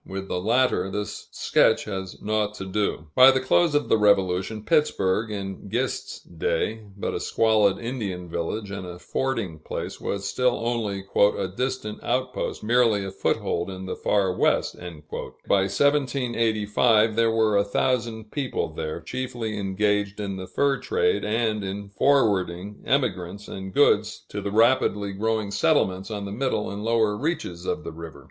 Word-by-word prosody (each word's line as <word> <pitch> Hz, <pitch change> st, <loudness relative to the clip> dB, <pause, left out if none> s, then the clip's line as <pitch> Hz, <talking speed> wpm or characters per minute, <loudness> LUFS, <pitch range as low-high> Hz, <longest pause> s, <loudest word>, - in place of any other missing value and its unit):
With 95 Hz, 0 st, -6 dB
the 90 Hz, -, -1 dB
latter, 120 Hz, -1 st, +2 dB
this 105 Hz, +1 st, -5 dB
sketch -, -, +2 dB
has 95 Hz, -3 st, -6 dB
naught 105 Hz, 0 st, 0 dB
to 95 Hz, -, -6 dB
do. 95 Hz, -5 st, -2 dB
By 130 Hz, +1 st, +9 dB
the 130 Hz, 0 st, +3 dB
close 145 Hz, +4 st, +2 dB
of 145 Hz, -, +2 dB
the 110 Hz, -, +3 dB
Revolution, 100 Hz, +1 st, +2 dB
Pittsburg 115 Hz, -, +2 dB
in 100 Hz, -1 st, -6 dB
Gist's 130 Hz, +4 st, -2 dB
day, 90 Hz, +6 st, -2 dB
but -, -, -3 dB
a -, -, -2 dB
squalid 110 Hz, -3 st, +3 dB
Indian 105 Hz, -8 st, -4 dB
village, 90 Hz, +5 st, -3 dB
and 95 Hz, -2 st, -5 dB
a 90 Hz, 0 st, -8 dB
fording 110 Hz, -6 st, -2 dB
place -, -, -6 dB
was 100 Hz, 0 st, -3 dB
still 125 Hz, -1 st, +1 dB
only 110 Hz, -5 st, -1 dB
"a 100 Hz, -2 st, +3 dB
distant 105 Hz, +2 st, -4 dB
out 130 Hz, 0 st, -1 dB
post, -, -, -4 dB
merely 115 Hz, -3 st, +3 dB
a 95 Hz, -, -5 dB
foothold 85 Hz, -1 st, -1 dB
in 95 Hz, 0 st, -7 dB
the 95 Hz, -, -4 dB
Far 95 Hz, -3 st, +1 dB
West." -, -, +1 dB
By 90 Hz, -, -6 dB, 0.8 s
1785, 115 Hz, -3 st, +2 dB
there 115 Hz, 0 st, +3 dB
were 110 Hz, -2 st, +2 dB
a 100 Hz, -, +4 dB
thousand 110 Hz, 0 st, -1 dB
people 140 Hz, -3 st, -2 dB
there, 80 Hz, +2 st, -4 dB
chiefly 120 Hz, 0 st, -4 dB
engaged 105 Hz, +1 st, 0 dB
in 100 Hz, -2 st, -3 dB
the 95 Hz, -1 st, -6 dB
fur 140 Hz, -1 st, +1 dB
trade 450 Hz, -1 st, +1 dB
and 110 Hz, -1 st, 0 dB
in 100 Hz, +1 st, -5 dB
forwarding 100 Hz, -6 st, +1 dB
emigrants 100 Hz, -7 st, -1 dB
and 95 Hz, 0 st, -7 dB
goods 110 Hz, -4 st, +2 dB
to 105 Hz, -, -4 dB
the 100 Hz, -, -3 dB
rapidly 105 Hz, -3 st, +3 dB
growing 110 Hz, 0 st, -1 dB
settlements 100 Hz, -5 st, +1 dB
on 105 Hz, -2 st, -4 dB
the 100 Hz, -, -5 dB
middle 120 Hz, -1 st, -1 dB
and 100 Hz, +1 st, -5 dB
lower 110 Hz, -2 st, +2 dB
reaches 105 Hz, -, -3 dB
of -, -, -2 dB
the -, -, -6 dB
river. 80 Hz, -2 st, -9 dB
105 Hz, 160 wpm, -25 LUFS, 95-120 Hz, 0.8 s, By